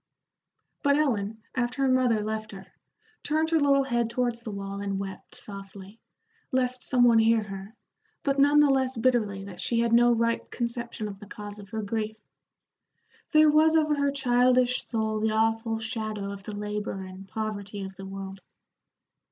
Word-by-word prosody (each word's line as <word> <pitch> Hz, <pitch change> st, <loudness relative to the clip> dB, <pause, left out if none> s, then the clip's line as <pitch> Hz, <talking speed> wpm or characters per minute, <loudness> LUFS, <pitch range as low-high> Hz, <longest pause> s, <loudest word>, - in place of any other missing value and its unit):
But 285 Hz, -2 st, +3 dB
Ellen, 220 Hz, -7 st, -1 dB
after 250 Hz, +2 st, -1 dB
her -, -, +3 dB
mother 250 Hz, -4 st, +3 dB
left 215 Hz, 0 st, -4 dB
her, 195 Hz, -, -9 dB, 0.6 s
turned 315 Hz, +2 st, 0 dB
her 325 Hz, -, +4 dB
little 280 Hz, -1 st, +4 dB
head 240 Hz, -3 st, 0 dB
towards 240 Hz, -1 st, -1 dB
the 235 Hz, -, -8 dB
wall 200 Hz, -1 st, -5 dB
and 200 Hz, -1 st, -2 dB
wept 195 Hz, -1 st, -7 dB
softly, 195 Hz, +1 st, -10 dB, 0.5 s
lest 255 Hz, -1 st, 0 dB
some 250 Hz, -2 st, +2 dB
one 235 Hz, -2 st, +6 dB
hear 225 Hz, 0 st, +4 dB
her, 195 Hz, +2 st, -8 dB, 0.5 s
but 275 Hz, -1 st, +1 dB
none 290 Hz, +1 st, +6 dB
the 290 Hz, -2 st, +5 dB
less 265 Hz, -2 st, +1 dB
bitterly 220 Hz, -5 st, +1 dB
that 190 Hz, -3 st, -8 dB
she 230 Hz, -1 st, +1 dB
had 235 Hz, 0 st, +1 dB
no 240 Hz, +1 st, +6 dB
right 230 Hz, 0 st, 0 dB
conception 235 Hz, -2 st, -4 dB
of 195 Hz, -1 st, -8 dB
the 210 Hz, -, -11 dB
cause 205 Hz, 0 st, -8 dB
of 200 Hz, -1 st, -12 dB
her 220 Hz, 0 st, -4 dB
grief. 220 Hz, +1 st, -3 dB, 1.1 s
There 310 Hz, -1 st, +6 dB
was 315 Hz, +1 st, +5 dB
over 305 Hz, -1 st, +3 dB
her 280 Hz, -1 st, +1 dB
childish 250 Hz, -1 st, +3 dB
soul 220 Hz, -2 st, -1 dB
the 215 Hz, 0 st, +1 dB
awful 225 Hz, +1 st, +1 dB
shadow 215 Hz, -3 st, -3 dB
of 200 Hz, -1 st, -8 dB
the 215 Hz, -, -6 dB
labor 210 Hz, -1 st, -4 dB
and 185 Hz, +1 st, -10 dB
poverty 205 Hz, 0 st, -4 dB
of 190 Hz, 0 st, -8 dB
the 195 Hz, 0 st, -9 dB
world. 195 Hz, 0 st, -7 dB
225 Hz, 175 wpm, -27 LUFS, 205-255 Hz, 1.1 s, one